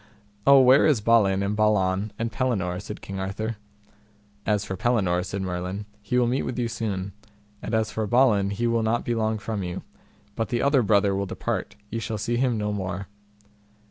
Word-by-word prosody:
Oh, 140 0 +9
where 130 +4 +6
is 145 -7 +3
Balin 105 -3 +3
and 100 +1 -1
Balan 105 -1 +1
and 115 0 -2
Pellinore? 100 -9 -1
said 105 0 -8
King 95 0 -6
Arthur. 105 +4 -3 0.9
As 105 -1 +1
for 95 - -4
Pellinore, 95 -5 +1
said 95 +1 -4
Merlin, 90 +2 -4 0.2
he 105 +5 -1
will 125 - +4
meet 125 +3 0
with 125 - -4
you 120 -1 0
soon; 100 -4 -3 0.5
and 110 - -2
as 110 -1 0
for 110 -1 -2
Balin 110 -4 +3
he 105 +4 -2
will 115 -1 +2
not 110 +2 0
be 120 - 0
long 110 -1 0
from 105 -1 -4
you; 90 -1 -5 0.5
but 115 -1 -2
the 120 - 0
other 140 -1 +4
brother 100 -2 +3
will 100 0 -2
depart, 115 -1 -3 0.2
ye 115 - -2
shall 110 0 -3
see 120 +3 -1
him 125 -2 +1
no 105 -1 -1
more. 100 -1 -4
105 Hz, 195 wpm, -25 LUFS, 100-115 Hz, 0.9 s, Oh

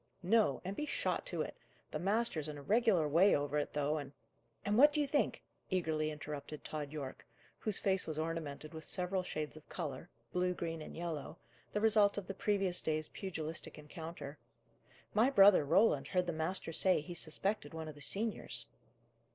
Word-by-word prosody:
"No, 200 - +3
and 195 +2 -3
be 300 - -3
shot - - -1
to - - -1
it! - - -7 0.4
The 155 - -2
master's 195 -4 +1
in 150 -1 -5
a 145 - -9
regular 205 - +3
way 170 +7 +5
over 145 +1 0
it, 145 - -2
though, 150 +1 +1
and 140 -1 -8 0.3
" 115 0 -38
"And 205 +1 +2
what 290 +6 +8
do 300 - +1
you 295 - +3
think?" 285 +1 0 0.3
eagerly 160 -4 0
interrupted 150 0 -6
Tod 150 -2 -4
Yorke, 140 -4 -6 0.4
whose 215 -3 -1
face 190 -1 +1
was 155 -1 -3
ornamented 155 -2 -3
with 160 0 -7
several 185 +3 -1
shades 155 -4 -4
of 155 - -14
colour, 160 -6 -5 0.2
blue, 180 0 +1
green, 165 -1 -3
and - - -8
yellow, 165 -4 -4 0.3
the 210 - -1
result 215 -2 +5
of 205 - -3
the 195 - -4
previous 195 -2 +1
day's 155 -1 -1
pugilistic 160 -5 -5
encounter: 150 -1 -8 0.7
"my 225 +5 +5
brother 200 - +7
Roland 145 -2 +4
heard 180 -1 +1
the 175 - -2
master 165 +1 0
say 185 +2 +3
he 175 +4 -7
suspected 165 0 -2
one 160 -1 -5
of 155 - -6
the 145 - -14
seniors." 215 +7 -2
165 Hz, 185 wpm, -35 LUFS, 150-195 Hz, 0.7 s, what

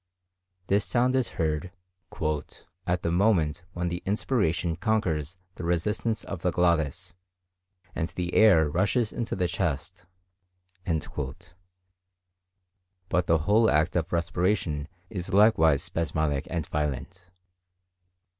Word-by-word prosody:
This 100 +2 +2
sound 125 +1 +1
is 130 -3 +2
heard 80 +2 -1 1.2
"at 90 0 0
the 85 - 0
moment 85 -4 +2
when 85 0 -2
the 85 +1 -4
inspiration 90 -6 0
conquers 90 - -1 0.2
the - - -8
resistance 105 +6 -1
of 95 -4 -6
the 90 - +1
glottis, 85 -4 0 0.8
and 80 - -1
the 90 0 -4
air 90 -8 +6
rushes 105 - +1
into 120 - -3
the 90 -2 0
chest." 85 +1 -3 0.8
But 75 -2 -4 1.7
the 80 - +4
whole 110 +2 +4
act 75 +3 +2
of 85 -2 -1
respiration 85 -3 0 0.2
is 95 -2 -3
likewise 80 -8 +5
spasmodic 80 -5 -1
and 85 -4 -2
violent. 75 +6 -4
85 Hz, 110 wpm, -27 LUFS, 80-100 Hz, 1.7 s, air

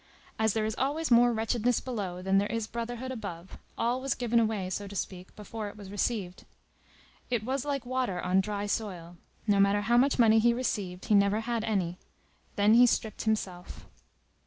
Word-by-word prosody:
As 220 -2 +2
there 220 -1 0
is 220 - -1
always 295 +3 -1
more 240 +1 +6
wretchedness 230 +1 0
below 195 -8 -5
than 195 +1 +3
there 205 - -1
is 230 -1 -1
brotherhood 235 +3 -5
above, 195 -7 -7 0.2
all 245 +2 0
was 270 -1 -1
given 240 -1 +1
away, 215 -4 0
so 200 +2 -3
to 200 - -9
speak, 185 -1 -5
before 210 0 -6
it 205 - -13
was 200 -2 -10
received. 205 -3 -2 0.9
It 240 -4 0
was 260 +3 -2
like 280 -3 -2
water 250 -7 -1
on 185 +2 +2
dry 205 +1 -3
soil; 180 -5 -4 0.3
no 205 -2 +3
matter 200 +1 +4
how 235 +3 +2
much 270 +3 +3
money 225 -2 +6
he 235 +1 +3
received, 195 -7 -3
he - - +1
never 200 +1 +4
had 230 -1 -2
any. 185 -6 -1 0.6
Then 205 +2 +4
he 245 +2 +7
stripped 220 -2 -1
himself. 190 -5 -3
220 Hz, 185 wpm, -29 LUFS, 200-240 Hz, 0.9 s, he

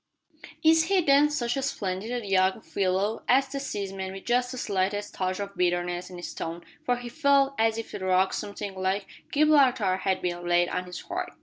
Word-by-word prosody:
"Is 320 0 +5
he, 390 +1 +3
then, 290 -1 +5
such 245 -5 -1
a 270 - -1
splendid 220 -1 -3
young 190 +1 +2
fellow!" 195 +3 -1
asked 265 +1 +4
the 275 - -3
seaman, 195 -7 -4
with 195 - -9
just 245 +1 +1
the 255 - -6
slightest 205 -1 -1
touch 185 0 -2
of 200 0 -5
bitterness 175 0 0
in 180 - -9
his 175 - -6
tone, 170 +1 -5 0.2
for 245 - +1
he 245 0 -7
felt 280 0 +3
as 225 0 +2
if 225 - -6
a - - -4
rock 185 0 +2
something 200 -1 -5
like 190 +1 -1 0.3
Gibraltar 265 -10 +4
had 190 0 -1
been 175 -1 -3
laid 175 0 +3
on 180 - -2
his 180 0 -7
heart. - - -5
200 Hz, 195 wpm, -27 LUFS, 185-250 Hz, 0.3 s, Is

